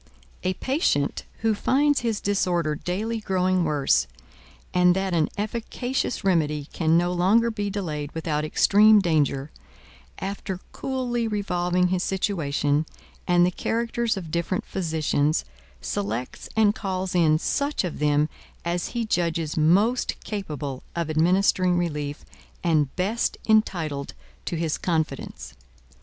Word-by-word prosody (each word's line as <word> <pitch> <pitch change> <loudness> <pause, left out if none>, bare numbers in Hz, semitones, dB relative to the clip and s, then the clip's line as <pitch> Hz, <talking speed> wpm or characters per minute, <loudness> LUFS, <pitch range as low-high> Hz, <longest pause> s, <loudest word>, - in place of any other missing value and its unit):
A 185 0 -1
patient 260 - 0 0.2
who 225 -1 +2
finds 285 +7 +2
his 225 -3 -1
disorder 175 -6 +1
daily 210 +9 -3
growing 185 -3 +1
worse, 140 - +2 0.7
and 180 0 +5
that 190 -1 -1
an 160 -3 +2
efficacious 235 +3 -2
remedy 150 -6 +1
can 165 -1 +3
no 175 +1 +1
longer 210 +7 +3
be 205 -2 -2
delayed 155 -7 -4
without 155 -2 -1
extreme 210 +7 +5
danger, 150 -5 +1 0.7
after 190 -1 -4
coolly 245 -3 -2
revolving 180 -4 0
his 185 0 0
situation, 155 -6 0 0.4
and 175 0 +5
the 180 - +1
characters 230 +2 -1
of 170 -5 -6
different 170 +2 -1
physicians, 155 -4 0 0.4
selects 100 - -4
and 215 -2 +4
calls 190 -3 -3
in 160 -3 +4
such 280 - -1
of 180 - -4
them 150 0 +3 0.4
as 175 +1 -1
he 235 - 0
judges 170 -6 -1
most 195 +11 +3
capable 150 -10 -4
of 170 -2 -1
administering 180 +2 +3
relief, 150 -4 -3 0.4
and 155 -6 +1
best 205 +6 0
entitled 170 -10 +1 0.3
to - - -2
his 160 -2 -1
confidence. 160 -5 -2
180 Hz, 125 wpm, -25 LUFS, 155-205 Hz, 0.7 s, and